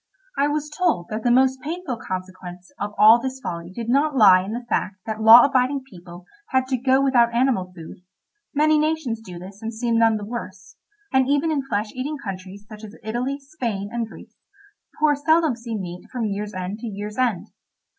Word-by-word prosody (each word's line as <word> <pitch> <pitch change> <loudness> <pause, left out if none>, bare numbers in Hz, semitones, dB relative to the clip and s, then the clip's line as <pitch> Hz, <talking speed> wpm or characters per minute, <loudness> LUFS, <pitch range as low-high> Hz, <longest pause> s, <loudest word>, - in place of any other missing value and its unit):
I 280 - +2
was 300 0 -2
told 325 - 0
that 215 +1 -3
the 245 - +1
most 260 +1 +3
painful 310 -3 -4
consequence 185 -2 -7
of 205 +1 -4
all 225 +3 +7
this 265 +1 -4
folly 170 -8 -6
did 230 +4 -6
not 280 +4 +2
lie 190 -5 +7
in 200 +3 -5
the 240 +1 -5
fact 200 - -1
that 220 0 -4
law 225 +2 +10
abiding 270 0 +1
people 175 -6 -13 0.2
had 260 0 +1
to 260 - +1
go 265 +1 +3
without 240 -4 +4
animal 235 -8 +1
food—many 290 - -3
nations 305 -7 -1
do 180 -5 -10
this 190 +4 -11
and 225 0 -4
seem 230 0 0
none 225 -1 +4
the 205 - -6
worse, 205 -5 -8 0.4
and 265 -1 +3
even 290 +3 +2
in 295 -3 0
flesh 210 -2 -2
eating 280 +4 -4
countries 195 -3 -8
such 215 0 -12
as 215 +1 -10
Italy, 245 +5 -2
Spain, 240 -9 -4
and 235 -1 -2
Greece, - - -14 0.6
the - - -28
poor 305 -1 +4
seldom 315 -1 +2
see 230 -1 -5
meat 180 -2 -8
from 245 -3 -2
year's 210 0 -4
end 185 +3 -4
to 235 - -6
year's 210 +2 -6
end. 235 -8 0
230 Hz, 195 wpm, -22 LUFS, 200-265 Hz, 0.6 s, law